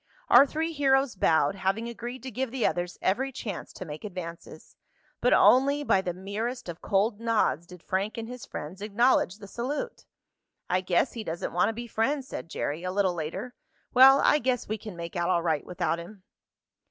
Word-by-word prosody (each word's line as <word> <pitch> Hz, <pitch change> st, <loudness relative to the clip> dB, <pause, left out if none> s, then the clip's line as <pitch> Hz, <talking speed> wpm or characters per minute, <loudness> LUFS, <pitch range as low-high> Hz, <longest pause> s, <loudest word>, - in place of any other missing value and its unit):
Our 280 Hz, -, +8 dB
three 320 Hz, +3 st, -2 dB
heroes 270 Hz, -4 st, +2 dB
bowed, 160 Hz, -5 st, +3 dB
having 195 Hz, +4 st, -1 dB
agreed 240 Hz, +2 st, -7 dB
to 260 Hz, -, -6 dB
give 260 Hz, +3 st, -2 dB
the 250 Hz, -1 st, -1 dB
others 175 Hz, 0 st, -1 dB
every 260 Hz, +8 st, +1 dB
chance 205 Hz, -7 st, -6 dB
to 185 Hz, -, -7 dB
make 150 Hz, -1 st, -8 dB
advances. 175 Hz, -5 st, -8 dB, 0.4 s
But -, -, +2 dB
only 280 Hz, +3 st, +5 dB
by 195 Hz, -9 st, +3 dB
the 180 Hz, -, -2 dB
merest 210 Hz, +7 st, -4 dB
of 170 Hz, -1 st, -7 dB
cold 205 Hz, +2 st, +1 dB
nods 220 Hz, -7 st, +1 dB
did 180 Hz, -1 st, -13 dB
Frank 195 Hz, +4 st, -2 dB
and 225 Hz, -1 st, -4 dB
his 250 Hz, 0 st, -8 dB
friends 175 Hz, +7 st, -7 dB
acknowledge 210 Hz, -2 st, +2 dB
the 205 Hz, -2 st, -11 dB
salute. 285 Hz, -, -4 dB, 0.6 s
"I 185 Hz, +1 st, +1 dB
guess 185 Hz, +6 st, +1 dB
he 230 Hz, -, -5 dB
doesn't 170 Hz, -3 st, -4 dB
want 175 Hz, -, +3 dB
to -, -, -2 dB
be 240 Hz, +2 st, -6 dB
friends," 260 Hz, +5 st, -1 dB
said 165 Hz, -, -7 dB
Jerry, 155 Hz, 0 st, -3 dB
a 185 Hz, -, -2 dB
little 190 Hz, -1 st, +1 dB
later. 170 Hz, +10 st, -5 dB, 0.4 s
"Well, 270 Hz, +2 st, +8 dB
I 295 Hz, -, +4 dB
guess 250 Hz, -2 st, -1 dB
we 215 Hz, +1 st, -3 dB
can 210 Hz, -2 st, -8 dB
make 170 Hz, 0 st, -7 dB
out 175 Hz, 0 st, 0 dB
all 175 Hz, -2 st, +2 dB
right 160 Hz, -4 st, 0 dB
without 170 Hz, -1 st, -1 dB
him." 185 Hz, +3 st, -11 dB
210 Hz, 195 wpm, -27 LUFS, 180-250 Hz, 0.6 s, Our